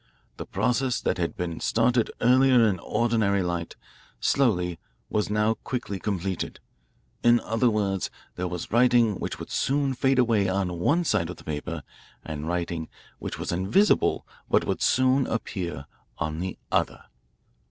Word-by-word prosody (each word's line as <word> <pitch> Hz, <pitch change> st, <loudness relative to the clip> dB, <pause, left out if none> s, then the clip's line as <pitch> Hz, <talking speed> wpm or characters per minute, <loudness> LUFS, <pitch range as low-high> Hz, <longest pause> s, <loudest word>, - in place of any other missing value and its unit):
The -, -, -7 dB
process 125 Hz, 0 st, 0 dB
that -, -, -1 dB
had 85 Hz, -, -2 dB
been 85 Hz, -2 st, -3 dB
started 115 Hz, 0 st, +2 dB
earlier 125 Hz, 0 st, +5 dB
in 95 Hz, -4 st, 0 dB
ordinary 105 Hz, -3 st, +1 dB
light, 85 Hz, -1 st, -3 dB, 0.4 s
slowly, 90 Hz, -11 st, +1 dB, 0.3 s
was 105 Hz, -1 st, 0 dB
now 105 Hz, +1 st, +2 dB
quickly 115 Hz, -3 st, -5 dB
completed. 95 Hz, -3 st, -3 dB, 0.6 s
In 120 Hz, 0 st, +5 dB
other 115 Hz, +2 st, +1 dB
words, 100 Hz, -3 st, 0 dB, 0.3 s
there 90 Hz, -, -2 dB
was 90 Hz, -1 st, -5 dB
writing 120 Hz, -3 st, +4 dB
which -, -, -4 dB
would -, -, -9 dB
soon 140 Hz, 0 st, +1 dB
fade 135 Hz, +1 st, +2 dB
away 115 Hz, -6 st, +3 dB
on 95 Hz, -2 st, -1 dB
one 165 Hz, -, +2 dB
side 95 Hz, -, +1 dB
of 90 Hz, -, -7 dB
the -, -, -14 dB
paper 75 Hz, 0 st, -4 dB, 0.4 s
and 75 Hz, -1 st, -5 dB
writing 85 Hz, -2 st, -2 dB, 0.3 s
which -, -, -5 dB
was -, -, -3 dB
invisible 95 Hz, -, +2 dB, 0.2 s
but -, -, +3 dB
would -, -, -2 dB
soon 130 Hz, +1 st, +3 dB
appear 90 Hz, -9 st, -3 dB, 0.3 s
on 80 Hz, 0 st, -3 dB
the 95 Hz, +1 st, -4 dB
other. -, -, 0 dB
105 Hz, 150 wpm, -26 LUFS, 90-120 Hz, 0.6 s, earlier